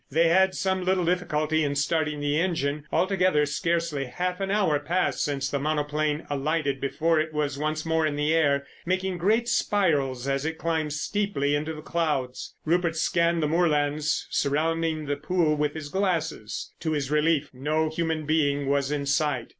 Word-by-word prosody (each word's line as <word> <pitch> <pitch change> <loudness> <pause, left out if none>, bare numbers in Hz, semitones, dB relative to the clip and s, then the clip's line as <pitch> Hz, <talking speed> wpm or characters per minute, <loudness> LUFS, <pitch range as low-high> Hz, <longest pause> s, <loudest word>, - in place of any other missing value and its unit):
They 165 +4 +3
had 190 +2 +4
some 190 -1 0
little 185 -1 +1
difficulty 160 -3 +1
in 145 -1 -1
starting 150 +1 0
the 145 +1 +1
engine. 150 -5 -1
Altogether, 185 -5 +2
scarcely 165 -1 -1
half 180 +8 -3
an 195 0 -2
hour 195 -8 +2
passed 180 +5 0
since 140 -1 -1
the 140 -1 -2
monoplane 150 +1 -1
alighted 145 -1 -1
before 155 +4 +1
it 155 0 -1
was 145 -2 -1
once 155 +1 -2
more 160 -1 +2
in 145 - -2
the 150 +2 +1
air 140 -4 +2 0.2
making 185 0 -1
great 220 +6 +2
spirals 145 - +1
as 135 0 0
it 160 +1 -3
climbed 160 -3 -1
steeply 155 -3 -1
into 150 +2 -1
the 155 - -9
clouds. 150 -8 -2
Rupert 170 0 +1
scanned 170 0 +1
the - - +2
moorlands 150 -2 +1
surrounding 160 +2 0
the 145 0 -2
pool 155 0 +1
with 150 0 -1
his 155 -2 -6
glasses. 165 - -2
To 160 -1 -1
his 145 -2 -2
relief 150 -1 +2
no 155 +5 0
human 160 -1 -2
being 145 -2 +1
was 140 0 +1
in 145 -1 -1
sight. 145 -3 0
155 Hz, 170 wpm, -26 LUFS, 145-170 Hz, 0.2 s, had